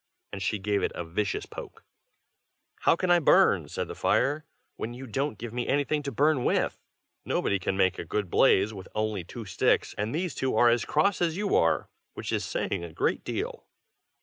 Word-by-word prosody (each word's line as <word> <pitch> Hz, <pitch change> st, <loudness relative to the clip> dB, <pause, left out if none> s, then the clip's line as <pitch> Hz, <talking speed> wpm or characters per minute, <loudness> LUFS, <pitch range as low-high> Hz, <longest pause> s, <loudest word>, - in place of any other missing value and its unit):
and 100 Hz, -, -5 dB
she 100 Hz, +3 st, 0 dB
gave 100 Hz, 0 st, 0 dB
it -, -, 0 dB
a 85 Hz, -, -4 dB
vicious 100 Hz, +5 st, -2 dB
poke. -, -, -10 dB, 1.0 s
"How -, -, +6 dB
can 180 Hz, +1 st, 0 dB
I 175 Hz, -, +6 dB
burn," 155 Hz, -, +4 dB
said -, -, -3 dB
the -, -, -6 dB
fire, 150 Hz, +3 st, +1 dB, 0.3 s
"when 120 Hz, +2 st, -5 dB
you 130 Hz, +2 st, -8 dB
don't 135 Hz, +1 st, -2 dB
give 115 Hz, +1 st, -7 dB
me 120 Hz, 0 st, -2 dB
anything 145 Hz, +2 st, +1 dB
to 140 Hz, -1 st, -4 dB
burn 145 Hz, -2 st, +2 dB
with? -, -, +1 dB, 0.4 s
nobody 100 Hz, -, 0 dB
can 95 Hz, +1 st, -2 dB
make 95 Hz, -2 st, +2 dB
a -, -, -3 dB
good 100 Hz, +4 st, -2 dB
blaze 100 Hz, +3 st, +4 dB
with 95 Hz, -2 st, -9 dB
only 110 Hz, -3 st, -1 dB
two 115 Hz, +6 st, -8 dB
sticks, 95 Hz, -, +1 dB
and 105 Hz, +2 st, -1 dB
these 175 Hz, 0 st, -1 dB
two 130 Hz, 0 st, -1 dB
are 120 Hz, -, +6 dB
as 120 Hz, 0 st, +2 dB
cross 200 Hz, -2 st, +2 dB
as 170 Hz, -1 st, +1 dB
you 205 Hz, -1 st, 0 dB
are, 80 Hz, -3 st, +2 dB, 0.3 s
which -, -, -5 dB
is -, -, 0 dB
saying -, -, -2 dB
a 85 Hz, -, -7 dB
great -, -, -1 dB
deal." -, -, -4 dB
115 Hz, 200 wpm, -28 LUFS, 100-145 Hz, 1.0 s, How